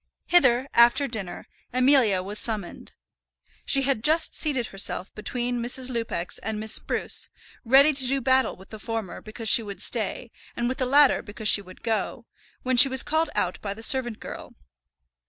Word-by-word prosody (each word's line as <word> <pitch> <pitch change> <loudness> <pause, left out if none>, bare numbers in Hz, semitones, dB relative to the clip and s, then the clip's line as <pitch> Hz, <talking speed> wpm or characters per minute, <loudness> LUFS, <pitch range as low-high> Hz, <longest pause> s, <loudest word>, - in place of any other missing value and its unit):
Hither, 265 -7 +3
after 235 +4 +4
dinner, 215 -8 -6 0.3
Amelia 250 -7 +2
was 205 +3 -6
summoned. 215 -6 -5 0.7
She 275 -1 +3
had 265 -5 -1
just 320 +4 +1
seated 275 -6 0
herself 195 -1 -3
between 240 +2 -4
Mrs. 250 +2 -2
Lupex 230 -7 -3
and 215 +1 -4
Miss 220 0 0
Spruce, - - -1 0.3
ready 275 +5 +5
to 265 -2 +1
do 270 +2 0
battle 260 +1 +1
with 190 +1 -17
the 215 - -10
former 225 -3 -6
because 220 +1 -6
she 230 - +7
would 205 -3 -9
stay, 230 +1 -4 0.2
and 240 - -2
with 255 - -4
the 255 - -1
latter 285 +1 +4
because 210 +1 -2
she 200 - +6
would 185 -1 -16
go, 225 +1 -3 0.4
when 255 -1 -1
she 270 +3 +8
was 265 -1 +4
called 320 +1 0
out 180 - -2
by 200 -1 -5
the 225 - -9
servant 240 -3 +2
girl. - - -10
240 Hz, 175 wpm, -24 LUFS, 215-265 Hz, 0.7 s, she